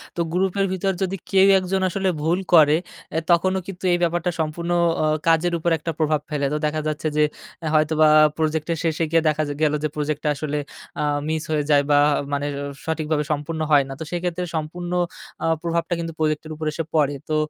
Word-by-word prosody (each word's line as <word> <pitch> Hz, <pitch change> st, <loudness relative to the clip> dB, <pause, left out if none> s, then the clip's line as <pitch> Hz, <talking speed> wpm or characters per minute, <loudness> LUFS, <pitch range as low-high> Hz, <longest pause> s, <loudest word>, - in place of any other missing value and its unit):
তো -, -, -6 dB
গ্রুপের 195 Hz, +2 st, +1 dB
ভিতর 195 Hz, +1 st, 0 dB
যদি 190 Hz, 0 st, 0 dB, 0.2 s
কেউ 195 Hz, 0 st, +6 dB
একজন 190 Hz, +1 st, -1 dB
আসলে 190 Hz, +1 st, 0 dB
ভুল 170 Hz, +4 st, +1 dB
করে, 155 Hz, -2 st, +7 dB, 0.4 s
আ -, -, +3 dB
তখনও 185 Hz, +2 st, +3 dB
কিন্তু 190 Hz, -2 st, -9 dB
এই -, -, +3 dB
ব্যাপারটা 175 Hz, +1 st, 0 dB
সম্পূর্ণ 160 Hz, +2 st, -2 dB, 0.3 s
অ -, -, +2 dB, 0.2 s
কাজের 165 Hz, +1 st, +3 dB
উপর 170 Hz, +1 st, 0 dB
একটা 165 Hz, +2 st, -4 dB
প্রভাব 155 Hz, -1 st, +1 dB
ফেলে। 145 Hz, -2 st, -1 dB
তো -, -, +1 dB
দেখা 155 Hz, +1 st, -1 dB
যাচ্ছে 155 Hz, +1 st, -2 dB
যে, 150 Hz, -, +5 dB, 0.5 s
হয়তোবা 155 Hz, 0 st, +4 dB, 0.3 s
প্রজেক্টের 160 Hz, +1 st, -1 dB
শেষে 165 Hz, 0 st, 0 dB
গিয়ে 165 Hz, -, +4 dB
দেখা 155 Hz, 0 st, +1 dB, 0.2 s
গেলো 150 Hz, -1 st, +3 dB
যে, -, -, +2 dB
প্রোজেক্টটা 150 Hz, 0 st, -1 dB
আসলে 150 Hz, 0 st, -3 dB, 0.4 s
আ -, -, +1 dB, 0.2 s
মিস 155 Hz, 0 st, -1 dB
হয়ে 150 Hz, -1 st, +1 dB
যায় 145 Hz, -1 st, +5 dB
বা 145 Hz, -, +6 dB, 0.3 s
মানে 145 Hz, 0 st, -1 dB, 0.4 s
সঠিকভাবে 155 Hz, -2 st, -1 dB
সম্পূর্ণ 150 Hz, +2 st, -3 dB
হয় 145 Hz, -2 st, +6 dB
না। -, -, -5 dB
তো -, -, -4 dB
সেক্ষেত্রে 180 Hz, 0 st, -2 dB
সম্পূর্ণ 175 Hz, +3 st, -4 dB, 0.5 s
আ -, -, 0 dB, 0.2 s
প্রভাবটা 170 Hz, +1 st, -1 dB
কিন্তু 165 Hz, -1 st, -4 dB
প্রোজেক্টের 155 Hz, 0 st, -1 dB
উপর 155 Hz, +1 st, -5 dB
এসে 165 Hz, -, -3 dB
পড়ে। 145 Hz, -2 st, +2 dB
তো 155 Hz, -, +1 dB
160 Hz, 190 wpm, -22 LUFS, 150-175 Hz, 0.5 s, করে